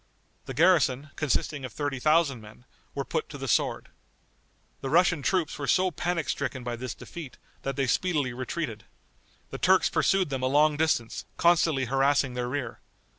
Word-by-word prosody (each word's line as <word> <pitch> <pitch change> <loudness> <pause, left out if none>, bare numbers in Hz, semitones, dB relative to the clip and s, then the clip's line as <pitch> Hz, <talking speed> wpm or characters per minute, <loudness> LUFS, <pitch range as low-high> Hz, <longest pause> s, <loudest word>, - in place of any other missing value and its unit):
The - - -6
garrison, 145 -5 +3
consisting 145 -1 -1
of 130 - -5
thirty 145 -3 -3
thousand 150 -3 +2
men, 110 +3 -15 0.3
were - - -2
put - - -3
to - - -8
the - - -5
sword. - - 0 0.9
The 135 - -3
Russian 175 0 +3
troops 175 +1 0
were 140 - -3
so 185 0 +3
panic 170 0 -2
stricken 135 -2 -3
by 120 -1 -3
this 125 0 -6
defeat, 155 -7 -9 0.2
that 135 -1 -3
they 135 0 0
speedily 145 -2 0
retreated. 125 -3 -4 0.7
The - - -6
Turks - - +4
pursued 190 -6 +2
them 135 -1 -2
a 130 - +1
long 150 +3 +4
distance, 150 -7 0
constantly 160 -5 +3
harassing 135 +1 +2
their 125 0 -3
rear. 130 -3 -4
140 Hz, 170 wpm, -27 LUFS, 130-160 Hz, 0.9 s, Turks